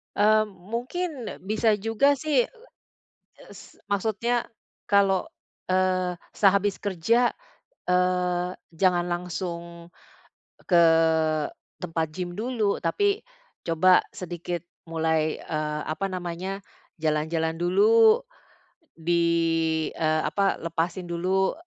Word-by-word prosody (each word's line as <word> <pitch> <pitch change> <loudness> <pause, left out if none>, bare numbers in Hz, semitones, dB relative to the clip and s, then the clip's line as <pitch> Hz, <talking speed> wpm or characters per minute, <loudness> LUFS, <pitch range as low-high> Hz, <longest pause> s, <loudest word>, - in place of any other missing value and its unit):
Mmm, 215 +1 +4
mungkin 240 - -4 0.3
bisa 215 +3 +1
juga 225 +7 +2
sih, 280 -3 +1 0.7
e - - -22
s - - -14 0.2
maksudnya, 220 +4 0 0.4
kalau, 195 -2 +3 0.4
eee, 185 -1 +1 0.2
sehabis 200 0 +2
kerja, 210 +6 +1 0.5
eee, 180 0 +1 0.2
jangan 175 0 +2
langsung, 170 -1 -5 0.7
ke 175 -2 +5 1.0
tempat 165 -2 -1
gym 180 -1 -4
dulu 220 -4 0
tapi 405 - 0 0.4
coba 180 +2 +5 0.2
sedikit 175 -1 -5 0.3
mulai, 160 -1 0
eee, 150 -1 -3
apa 175 +6 -2
namanya 185 +2 -5 0.3
jalan-jalan 160 +1 -1
dulu, 215 +5 +5 0.7
di, 165 -1 +1
eee, 155 -1 0
apa 200 -1 +1
lepasin 170 +2 -3
dulu. 185 +3 +1
180 Hz, 90 wpm, -26 LUFS, 170-205 Hz, 1.0 s, ke